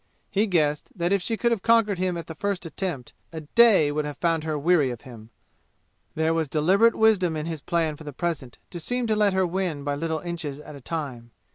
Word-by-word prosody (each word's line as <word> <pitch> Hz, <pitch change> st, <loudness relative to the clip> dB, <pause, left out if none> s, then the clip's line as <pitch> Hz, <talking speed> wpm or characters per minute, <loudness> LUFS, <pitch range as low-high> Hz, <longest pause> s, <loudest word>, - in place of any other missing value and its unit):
He 210 Hz, +3 st, +2 dB
guessed 150 Hz, -6 st, +1 dB
that 175 Hz, 0 st, 0 dB
if 200 Hz, -, +2 dB
she 225 Hz, +4 st, -2 dB
could 235 Hz, +1 st, +1 dB
have 230 Hz, -4 st, 0 dB
conquered 225 Hz, -4 st, +3 dB
him 180 Hz, -1 st, 0 dB
at 170 Hz, -, -6 dB
the 160 Hz, -, -7 dB
first 195 Hz, +2 st, -3 dB
attempt 165 Hz, -5 st, -5 dB, 0.2 s
a 160 Hz, -1 st, -6 dB
day 190 Hz, -2 st, +5 dB
would 150 Hz, +1 st, -1 dB
have 150 Hz, -1 st, -6 dB
found 165 Hz, -2 st, 0 dB
her 155 Hz, -1 st, -1 dB
weary 150 Hz, -2 st, +3 dB
of 120 Hz, -2 st, -6 dB
him; 115 Hz, -3 st, -12 dB, 0.9 s
there 160 Hz, +1 st, +1 dB
was 165 Hz, -2 st, 0 dB
deliberate 190 Hz, +11 st, +3 dB
wisdom 195 Hz, -7 st, +3 dB
in 155 Hz, -, -3 dB
his 165 Hz, -3 st, -5 dB
plan 165 Hz, -2 st, 0 dB
for 160 Hz, -, -11 dB
the 150 Hz, -, -7 dB
present 145 Hz, -4 st, -4 dB
to 175 Hz, -, -6 dB
seem 245 Hz, +8 st, -1 dB
to 220 Hz, -1 st, +1 dB
let 210 Hz, -2 st, +3 dB
her 190 Hz, 0 st, +2 dB
win 175 Hz, -5 st, -2 dB
by 145 Hz, 0 st, -1 dB
little 160 Hz, +2 st, -2 dB
inches 165 Hz, -5 st, -5 dB
at 150 Hz, 0 st, -11 dB
a 140 Hz, -, -11 dB
time. 130 Hz, -6 st, -5 dB
165 Hz, 230 wpm, -25 LUFS, 150-190 Hz, 0.9 s, day